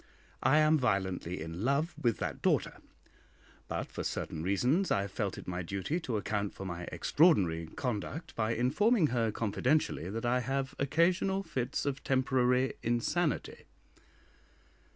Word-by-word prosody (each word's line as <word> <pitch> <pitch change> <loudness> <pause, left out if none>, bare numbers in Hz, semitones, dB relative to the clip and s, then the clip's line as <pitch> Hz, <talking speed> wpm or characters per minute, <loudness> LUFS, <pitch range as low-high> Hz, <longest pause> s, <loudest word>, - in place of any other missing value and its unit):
I 140 +3 +4
am 155 0 +5
violently 95 -6 -1
in 80 +4 -5
love 140 +6 +1
with 120 -3 0
that - - -4
daughter, - - +1 0.9
but - - -4
for - - -4
certain 80 - -3
reasons 125 - +1
I 100 - +2
have 100 -1 -5
felt 100 -1 -2
it - - -9
my 90 0 -3
duty 95 - -2
to 125 -10 -2
account 100 0 -2
for 95 - -7
my 85 -1 -5
extraordinary 90 - +3
conduct 125 - -4
by 110 0 0
informing 165 - +3
her 115 -3 +1
confidentially 115 - 0
that 115 +4 -4
I 125 +1 +2
have 135 +2 -2
occasional 180 +7 +2
fits 130 -5 -2
of 140 -1 -2
temporary 130 -1 +2
insanity. 120 +8 -1
125 Hz, 145 wpm, -31 LUFS, 100-145 Hz, 0.9 s, am